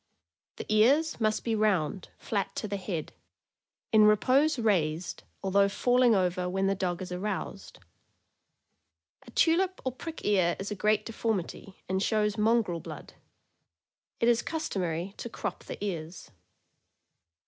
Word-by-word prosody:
The - - -7
ears 265 +10 +3
must 215 0 +1
be 230 - -1
round, 195 -5 0
flat 200 -3 -3
to 215 - -3
the 200 0 -3
head; 180 -5 -4 0.8
in 215 -1 +6
repose 260 +8 +4
raised, 175 -7 0 0.2
although 200 +1 +3
falling 245 +2 +3
over 180 -1 0
when 190 +1 0
the 195 - +2
dog 185 -1 -2
is 180 - -8
aroused. 195 +4 -4 1.5
A - - -10
tulip 370 +3 +2
or 260 - 0
prick 325 +6 -8
ear 185 -4 +3
is 195 +2 -5
a - - -2
great 210 +2 +1
deformity, 210 -4 -4
and 190 +1 0
shows 210 0 +1
mongrel 215 -5 +2
blood. - - -9 1.1
It 230 - +2
is 240 -1 +4
customary 190 - -3
to 235 - -6
crop - - -5
the - - -6
ears. 170 - -6
205 Hz, 135 wpm, -29 LUFS, 185-230 Hz, 1.5 s, in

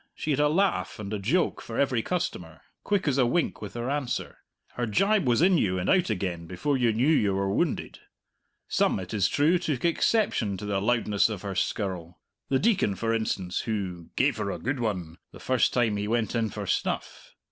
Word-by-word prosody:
She 155 - -3
had 140 - +1
a 150 - +4
laugh 190 +5 +1
and 105 -1 -6
a 105 - -2
joke 150 - 0
for 115 - -7
every 130 -4 +2
customer, 90 - -4 0.2
quick 200 -5 0
as 140 -1 +2
a 125 - +4
wink 170 +7 0
with 105 0 -7
her 120 +1 -3
answer; 140 -2 -3 0.3
her 120 -1 -3
gibe 195 - +2
was 120 +6 +3
in 180 -2 +5
you 95 -5 +1
and 90 - -2
out 185 -7 +3
again 90 -5 -3
before 95 - -1
you 120 -3 +2
knew 115 +4 +1
you 105 -11 +3
were 95 0 0
wounded. - - -1 0.7
Some, - - +1
it 95 +1 -7
is 100 -4 +2
true, 160 +5 +3
took 155 -5 -2
exception 170 - +1
to 105 - -7
the 100 -1 -1
loudness 110 -2 +2
of 105 -3 -5
her 100 -1 -3
skirl 90 -4 -3 0.3
the 135 - +3
Deacon, 195 - +2
for 115 +3 -1
instance, 95 -5 -1
who 95 -6 -4
"gave 135 0 +2
her 105 -2 -2
a - - -3
good 135 +2 -2
one" 90 -7 -3
the - - -12
first 130 -3 +2
time 115 -4 +1
he 100 0 -2
went 115 0 0
in 115 -2 0
for - - -6
snuff. - - -3
115 Hz, 210 wpm, -27 LUFS, 100-145 Hz, 0.7 s, in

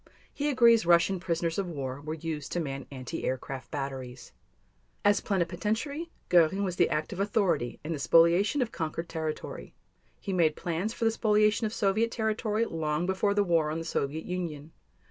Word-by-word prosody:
He 290 +1 -1
agrees 235 -4 +5
Russian 175 +2 +4
prisoners 170 0 -1
of 195 - -1
war 135 -4 -5
were 155 +2 -4
used 155 -3 -5
to 175 - 0
man 140 -4 -4
anti 130 -3 -6
aircraft 130 +1 -4
batteries. 130 -4 -6 0.7
As 205 0 +4
Plenipotentiary, 215 - -2 0.2
Göring 175 +3 +4
was 185 -3 -2
the - - +4
active 155 +4 -2
authority 190 - 0
in 160 +2 -3
the 150 - -4
spoliation 170 - +4
of 230 - -7
conquered 165 +1 -4
territory. 160 -2 -5 0.4
He 195 - -4
made 160 -4 +3
plans 175 +5 -2
for 230 - -3
the 225 - +4
spoliation 215 0 +2
of - - -6
Soviet 215 +2 +1
territory 220 0 0
long 155 -3 -1
before 190 +2 +1
the 205 - +4
war 165 -4 +2
on 155 - -2
the 165 - -5
Soviet 155 0 -2
Union. 165 -4 -4
175 Hz, 170 wpm, -29 LUFS, 155-210 Hz, 0.7 s, agrees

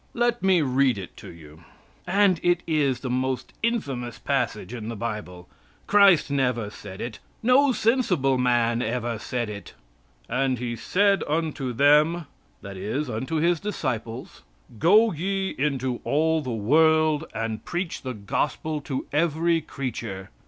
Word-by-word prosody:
Let 240 0 +1
me 185 -4 +3
read 130 -2 +2
it 95 -3 -8
to - - -10
you. 80 -1 -15 0.4
And 190 -2 +3
it 175 0 +2
is 140 -6 +1
the 130 - -4
most 130 0 -2
infamous 135 - -2
passage 120 -6 -2
in 115 -2 -6
the 115 - -4
Bible. 105 -6 -6 0.4
Christ 200 -7 +5
never 125 -6 0
said 100 -2 -10
it. 120 -2 -6 0.2
No 260 +4 +5
sensible 195 - +1
man 120 -1 +2
ever 120 -1 -2
said 120 +1 -3
it. 100 -3 -9 0.5
"And 130 +1 0
He 120 0 -3
said 200 - +2
unto 150 -4 -1
them" 150 +6 +4 0.4
that 100 -1 -8
is, 120 +9 -3
unto 130 +9 -3
His 170 +1 +2
disciples 130 - -4 0.4
"Go 210 +7 +5
ye 190 +3 -2
into 130 -3 -1
all 160 +2 +1
the 130 - -6
world 155 +7 +3
and 110 0 -3
preach 175 0 -4
the 130 -2 -5
gospel 145 +9 -2
to 135 -2 -4
every 165 +2 +2
creature. 115 -10 -6
135 Hz, 145 wpm, -25 LUFS, 115-165 Hz, 0.5 s, Christ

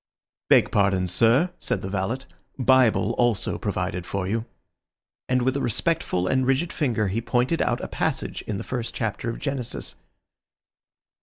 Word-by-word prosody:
"Beg - - +5
pardon, 100 -2 +2
sir," 115 - +3
said 120 -7 -2
the - - -3
valet, 100 +7 -2 0.4
"Bible 130 -4 +4
also 120 -5 +1
provided 90 0 -2
for 95 +1 -3
you," 110 +3 -1 0.8
and 125 -1 +2
with 130 +2 +1
a 140 - -1
respectful 120 - 0
and 130 +4 +2
rigid 135 +6 +1
finger 120 -8 0
he 110 +5 -1
pointed 125 +7 +1
out 120 0 0
a - - -4
passage - - -2
in 105 - -2
the - - -5
first 120 -2 -4
chapter 115 0 -2
of 115 - -4
Genesis. 135 -4 -3
120 Hz, 155 wpm, -25 LUFS, 100-130 Hz, 0.8 s, Beg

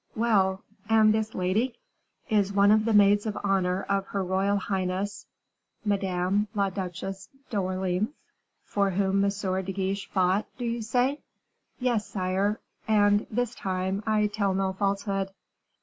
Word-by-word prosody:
"Well 195 -4 +2 0.3
and 220 -1 +5
this 220 0 -1
lady?" 200 +8 0 0.5
"Is 205 -3 +2
one 200 0 +5
of 215 0 +4
the 225 - +2
maids 205 +1 +5
of 210 - -3
honor 190 -2 +1
of 195 0 -1
her 195 -1 -2
royal 190 +2 +1
highness 190 +1 -2 0.6
Madame 195 0 +1
la 200 -1 +1
Duchesse 190 +1 -5 0.2
d'Orleans." 185 0 0 0.6
"For 200 -1 +1
whom 195 +1 +1
M. 200 - +3
de 190 -1 -2
Guiche 195 +1 -2
fought 190 +2 +1
do 245 - -4
you 235 0 -2
say?" 250 +6 +1 0.6
"Yes, 240 -4 0
sire, 195 +2 -1 0.3
and, 205 -1 +3
this 245 +1 -1
time, 190 0 -2
I 215 -1 +3
tell 205 -2 0
no 190 0 0
falsehood." 195 0 -1
200 Hz, 140 wpm, -27 LUFS, 190-210 Hz, 0.6 s, and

